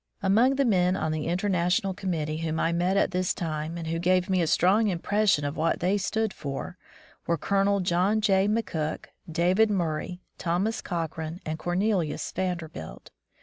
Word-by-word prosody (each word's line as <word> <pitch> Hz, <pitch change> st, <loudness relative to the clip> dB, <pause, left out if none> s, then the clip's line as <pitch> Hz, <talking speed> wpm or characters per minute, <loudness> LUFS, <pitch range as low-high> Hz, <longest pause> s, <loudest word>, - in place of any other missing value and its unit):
Among 225 Hz, +8 st, +4 dB
the 275 Hz, 0 st, +2 dB
men 185 Hz, -5 st, +3 dB
on 160 Hz, -4 st, -1 dB
the 155 Hz, 0 st, -2 dB
International 180 Hz, +1 st, +1 dB
Com 185 Hz, 0 st, -3 dB
mittee 155 Hz, -2 st, -2 dB
whom 160 Hz, -1 st, -2 dB
I 165 Hz, -, +1 dB
met 175 Hz, +3 st, +1 dB
at -, -, +2 dB
this 180 Hz, 0 st, 0 dB
time 160 Hz, 0 st, -3 dB
and 165 Hz, -, -5 dB
who 165 Hz, +1 st, -2 dB
gave 180 Hz, +1 st, +2 dB
me 185 Hz, -1 st, +3 dB
a 165 Hz, -, +1 dB
strong 200 Hz, +8 st, +3 dB
impression 195 Hz, -3 st, +1 dB
of 145 Hz, +2 st, -3 dB
what 160 Hz, +1 st, 0 dB
they 185 Hz, +3 st, +1 dB
stood 220 Hz, +1 st, -1 dB
for, 140 Hz, +4 st, -5 dB, 0.5 s
were 170 Hz, -, +1 dB
Colonel 200 Hz, +2 st, +1 dB
John 185 Hz, +4 st, +2 dB
J. 195 Hz, -2 st, +3 dB
McCook, 175 Hz, -8 st, -2 dB, 0.3 s
David 180 Hz, +6 st, +3 dB
Murray, 175 Hz, -2 st, -2 dB, 0.2 s
Thomas 190 Hz, +7 st, -1 dB
Cochrane, 165 Hz, -1 st, -4 dB
and 155 Hz, +1 st, -3 dB
Cornelius 175 Hz, -3 st, -1 dB
Vanderbilt. 160 Hz, -, -5 dB
180 Hz, 170 wpm, -27 LUFS, 160-195 Hz, 0.5 s, Among